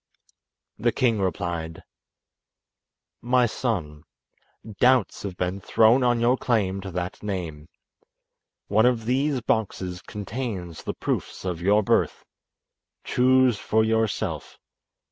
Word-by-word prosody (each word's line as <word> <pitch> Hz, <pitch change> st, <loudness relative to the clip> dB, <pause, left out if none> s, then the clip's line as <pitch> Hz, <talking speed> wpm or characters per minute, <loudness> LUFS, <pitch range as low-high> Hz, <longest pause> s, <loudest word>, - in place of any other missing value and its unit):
The -, -, +2 dB
king 115 Hz, -4 st, +1 dB
replied: 85 Hz, -3 st, -3 dB, 1.4 s
"My 125 Hz, +1 st, +3 dB
son, 90 Hz, -, -3 dB, 0.8 s
doubts 130 Hz, +1 st, +3 dB
have 95 Hz, -3 st, -6 dB
been 90 Hz, +2 st, -2 dB
thrown 115 Hz, +6 st, +4 dB
on 120 Hz, -1 st, +2 dB
your 120 Hz, +2 st, +3 dB
claim 100 Hz, -7 st, 0 dB
to 95 Hz, -, -6 dB
that 90 Hz, 0 st, -4 dB
name. 85 Hz, -7 st, -5 dB, 1.0 s
One 110 Hz, +4 st, +4 dB
of 120 Hz, -3 st, 0 dB
these 135 Hz, +2 st, +1 dB
boxes 95 Hz, -7 st, -2 dB
contains 105 Hz, -6 st, -5 dB
the -, -, -5 dB
proofs -, -, -3 dB
of 90 Hz, -2 st, -3 dB
your 105 Hz, +4 st, +3 dB
birth. -, -, +1 dB, 0.8 s
Choose 130 Hz, -3 st, +3 dB
for 110 Hz, 0 st, +2 dB
yourself. 110 Hz, -1 st, -1 dB
105 Hz, 110 wpm, -25 LUFS, 90-120 Hz, 1.4 s, thrown